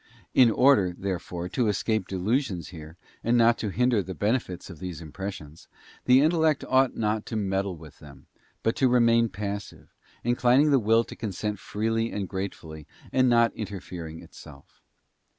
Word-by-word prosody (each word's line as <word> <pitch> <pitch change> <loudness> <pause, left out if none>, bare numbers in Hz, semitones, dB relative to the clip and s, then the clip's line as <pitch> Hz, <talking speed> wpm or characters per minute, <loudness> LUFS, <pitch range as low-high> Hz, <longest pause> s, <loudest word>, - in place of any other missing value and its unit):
In 125 -3 +6
order, 110 -7 +4
therefore, 90 -2 -4
to 120 +1 0
escape 105 0 0
delusions 95 - -1
here, 80 -1 -11 0.3
and 120 +1 +2
not 115 0 +4
to 105 - -2
hinder 120 +1 +2
the 95 0 -7
benefits 105 -4 -2
of 85 -5 -11
these 90 -2 -6
impressions, 80 -1 -8 0.4
the 130 +1 +6
intellect 160 -2 +2
ought 130 0 +3
not 110 -1 0
to 115 - -5
meddle 95 -3 -1
with 80 -2 -14
them, - - -15 0.4
but 115 - +1
to 130 - +3
remain 115 -1 +4
passive, 100 +1 -6 0.3
inclining 125 +4 +3
the 135 - +5
will 115 +1 +3
to - - -11
consent 105 -1 -4
freely 115 +3 -2
and 100 -2 -3
gratefully, 85 -6 -6 0.3
and 130 -1 +4
not 115 -1 +3
interfering 90 -6 -7
itself. 70 -2 -15
105 Hz, 155 wpm, -26 LUFS, 90-120 Hz, 0.4 s, In